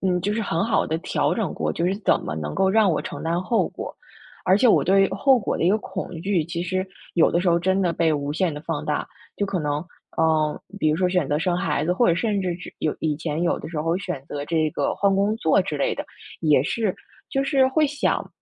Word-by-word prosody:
嗯， 180 -2 +2
就 205 +2 0
是 225 - -1
很 165 -2 0
好 230 - +1
地 160 - -1
调 180 - 0
整 220 -5 -1
过， - - -1
就 170 - -2
是 190 - +1
怎 205 - +2
么 - - -4
能 75 -1 -4
够 190 0 +2
让 215 -2 +4
我 155 - 0
承 - - -6
担 170 +2 0
后 230 +3 +1
果？ - - -7 0.5
而 185 - +5
且 250 - +4
我 220 - +5
对 195 +1 +4
后 270 -3 +4
果 200 - -2
的 - - -2
一 - - +4
个 215 - +3
恐 190 -3 -6
惧， 190 -4 +1
其 170 +1 -4
实 185 +1 -1 0.3
有 165 - +4
的 170 - +1
时 185 - +2
候 170 0 +4
真 190 +2 +1
的 175 -2 +1
被 165 -1 +2
无 145 0 -2
限 170 0 0
地 145 - -6
放 160 -3 -3
大， 150 -1 -1 0.3
就 205 - 0
可 185 -3 -2
能， 150 +2 -2 0.3
呃， 155 -2 +2 0.2
比 155 - +2
如 155 - +2
说 185 0 +2
选 180 -6 0
择 150 +1 +1
生 175 +2 0
孩 150 -3 0
子， 175 - +1
或 235 +4 +3
者 170 - +4
甚 205 +2 0
至 180 -2 -1
是 - - -9
有 155 - -1
以 155 -2 0
前 160 +1 -3
有 175 - +1
的 - - -7
时 160 -3 -3
候 165 +2 0
选 180 -9 -5
择 145 -1 -5
这 160 -2 +1
个 145 - -1
换 200 -1 +2
工 205 +3 +1
作 190 -1 +3
之 155 -6 -4
类 - - 0
的 - - -5 0.4
也 150 -5 +4
是 215 +1 -1 0.4
就 270 0 0
是 270 -2 +3
会 305 +3 +2
想， 285 +1 -1
175 Hz, 280 characters per minute, -23 LUFS, 155-195 Hz, 0.5 s, 而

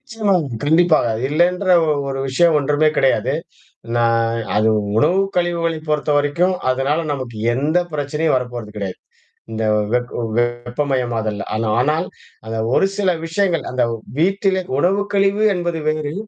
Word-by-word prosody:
நிச்சயமா 225 -6 -1 0.3
கண்டிப்பாக. 160 -2 +3 0.2
இல்லன்ற 175 +6 +1 0.4
ஒரு 135 0 -3
விஷயம் 165 +5 +3
ஒன்றுமே 145 +2 +2
கிடையாது. 135 0 +2 0.6
நான் 115 -1 +2 0.2
அது 110 +1 +3 0.3
உணவு 165 +11 +3 0.2
கழிவுகளை 170 -2 0
பொறுத்தவரைக்கும், 150 +4 +1
அதனால 135 +4 +1
நமக்கு 130 -5 -5 0.2
எந்த 145 +7 0 0.2
பிரச்சனையும் 150 +1 0
வரப்போறது 120 -4 -4
கிடையாது. 100 -3 -5 0.5
இந்த 110 0 -3 0.3
வெக் 120 0 -1 0.2
வெப்பமயம் 120 +1 -1
ஆதல். 110 -2 -3
ஆனா 110 0 -1
ஆனால் 155 +7 +1 0.4
அந்த 110 0 -4 0.2
ஒரு 195 - +3
சில 195 -2 +1 0.2
விஷயங்கள், 170 -1 0
அந்த 125 -1 +1 0.4
வீட்டிலே 190 +1 +1 0.2
உணவுக்கழிவு 200 +4 +1
என்பது 175 -2 -2
வேறு. 155 -1 -2
150 Hz, 120 wpm, -19 LUFS, 120-175 Hz, 0.6 s, கண்டிப்பாக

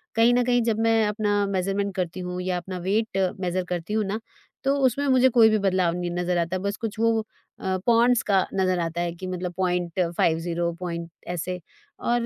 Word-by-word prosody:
कहीं 230 +2 +5
न 245 0 +3
कहीं 245 0 +3
जब 225 -2 +1
मैं 225 -1 +3
अपना 205 -1 +1
मेज़रमेंट 195 +1 -1
करती 185 -1 -3
हूँ 180 0 -4
या 180 0 -1
अपना 185 +1 -6
वेट 210 +2 0 0.2
मेज़र 185 0 -1
करती 175 +3 -3
हूँ 215 0 +2
ना, 205 +3 -2 0.4
तो 275 +1 +2
उसमें 275 +3 +1
मुझे 260 -1 +5
कोई 230 -2 +6
भी 215 - +3
बदलाव 185 -3 +2
नहीं 175 -1 -3
नज़र 175 0 -1
आता, 170 +2 0
बस 200 +2 -3
कुछ 220 -1 -5
वो 230 0 +3 0.4
अ, 190 0 -1
पाउंड्स 235 0 +5
का 195 -2 +4
नज़र 185 -2 +1
आता 170 0 -2
है 175 0 -1
कि 185 +2 -7
मतलब 180 -1 -4
.50 175 -1 0
पॉइंट 170 -2 -4 0.2
ऐसे 180 +1 -3 0.4
और 240 0 0
190 Hz, 195 wpm, -25 LUFS, 180-225 Hz, 0.4 s, कोई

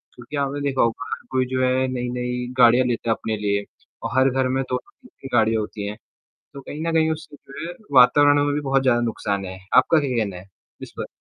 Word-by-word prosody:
क्योंकि 125 +4 -9
आपने 140 +1 -2
देखा 140 -2 0
होगा 115 +2 0
हर - - -8
कोई 130 -1 +1
जो 130 - +1
है 130 +1 +2
नई-नई 125 0 -3
गाड़ियाँ 125 +1 +6
लेता 115 -1 -2
है - - +5
अपने 110 0 -3
लिए 100 0 -1 0.4
और 130 - -3
हर 130 +1 +5
घर 130 0 0
में 130 +1 0
2-2 125 -1 -5
3-3 135 - -12
गाड़ियाँ 110 0 +3
होती 105 -1 -5
हैं, 105 - -6 0.6
तो 140 - -7
कहीं 145 +3 -7
न 165 - 0
कहीं 160 -1 +3
उससे 155 -1 -8
जो 140 +3 -9
है 175 - -7 0.3
वातावरण 145 +3 +5
में 145 0 0
भी 150 - -1
बहुत 135 -1 +1
ज़्यादा 125 -3 +3
नुकसान 100 -4 -2
है। 95 0 -7 0.2
आपका 155 +5 +5
क्या 135 -4 -2
कहना 100 -3 -6
है? 90 +2 -11 0.4
इस - - -9
पर? - - -3
130 Hz, 230 wpm, -22 LUFS, 115-140 Hz, 0.6 s, गाड़ियाँ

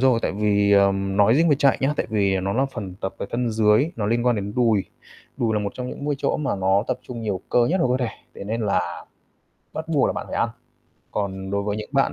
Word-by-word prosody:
rồi, 130 -3 +4
tại - - 0
vì, 100 0 +2
ờm, 100 -1 +3
nói 105 +3 +5
riêng 165 +4 +4
về 145 - +4
chạy 140 -2 +3
nhá, 135 +2 +2
tại - - -1
vì 100 -3 +1
nó 95 +1 -1
là 130 +5 +2
phần 105 -9 -7
tập 95 - -3
về - - -4
thân 120 0 -1
dưới, 110 +7 +3
nó 105 -3 -1
liên 120 +3 +1
quan 120 -2 +3
đến 100 0 -4
đùi. 115 -5 +3 0.5
Đùi 115 -2 0
là 105 - +1
một 100 -1 -3
trong 125 0 -5
những - - -7
môi 145 0 0
chỗ - - 0
mà 150 -7 -1
nó 95 +1 +2
tập 125 - -1
trung 120 -2 -7
nhiều 100 -4 -2
cơ 120 -1 +3
nhất 185 +7 +1
của 125 0 +2
cơ 125 - 0
thể, - - -6 0.2
thế - - -8
nên 110 +3 -2
là 90 -5 -1 0.7
bắt 160 +1 -5
buộc 150 -5 +3
là - - 0
bạn - - -5
phải - - -5
ăn. - - +2 0.6
Còn 95 -2 -3
đối 100 0 0
với 105 0 -2
những 105 - -6
bạn 135 -1 +2
110 Hz, 265 wpm, -23 LUFS, 100-125 Hz, 0.7 s, nói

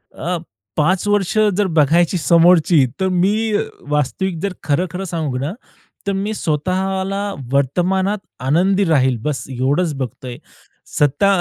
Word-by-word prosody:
अ, 175 +2 -2 0.4
5 180 +6 +1
वर्ष 205 0 +1 0.2
जर 205 -1 +2
बघायची 165 +4 +3
समोरची, 170 -2 +4
तर 190 - +1
मी 205 +5 +1 0.4
वास्तविक 150 +5 -1
जर 200 -2 -2
खरं-खरं 175 +5 -1
सांगू 160 -7 -3
ना, 140 +5 -2 0.6
तर - - +2
मी 200 +3 -2
स्वतःला 190 +4 -1 0.2
वर्तमानात 185 +9 +1 0.2
आनंदी 180 +9 +2
राहील 130 -7 +2
बस. 150 +1 -2
एवढंच 140 +6 0
बघतोय. 125 -1 -6 0.6
सत्ता 145 +6 +3
175 Hz, 120 wpm, -19 LUFS, 145-190 Hz, 0.6 s, समोरची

